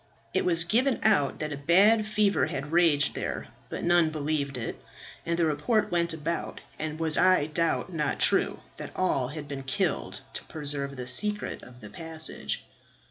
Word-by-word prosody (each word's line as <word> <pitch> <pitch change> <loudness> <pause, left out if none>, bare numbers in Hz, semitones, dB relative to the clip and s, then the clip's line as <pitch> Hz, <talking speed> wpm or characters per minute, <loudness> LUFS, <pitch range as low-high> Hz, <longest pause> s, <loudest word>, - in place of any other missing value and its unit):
It - - +1
was 170 -2 +5
given 240 +9 +2
out 200 -11 +3
that 150 -1 -2
a - - -5
bad 200 +9 +4
fever 210 -1 +2
had 140 +2 -5
raged 165 -4 +3
there, - - -4 0.2
but - - -5
none 175 -2 +4
believed 145 -3 -2
it; 115 - -5 0.5
and 170 0 0
the 170 - +3
report 160 +9 +1
went 170 -1 +1
about, 165 +1 -3 0.2
and 155 0 -4
was 160 -1 +3
I 185 -5 +5
doubt 165 +4 -1
not 150 -3 -1
true, - - +2 0.2
that - - -8
all 140 -9 +1
had 150 +1 -7
been 140 -1 -5
killed, 135 0 -1
to - - -5
preserve 140 -2 -3
the 125 -1 -6
secret 210 +12 -1
of 125 0 -14
the 105 - -9
passage." 160 -1 -5
160 Hz, 175 wpm, -28 LUFS, 145-175 Hz, 0.5 s, was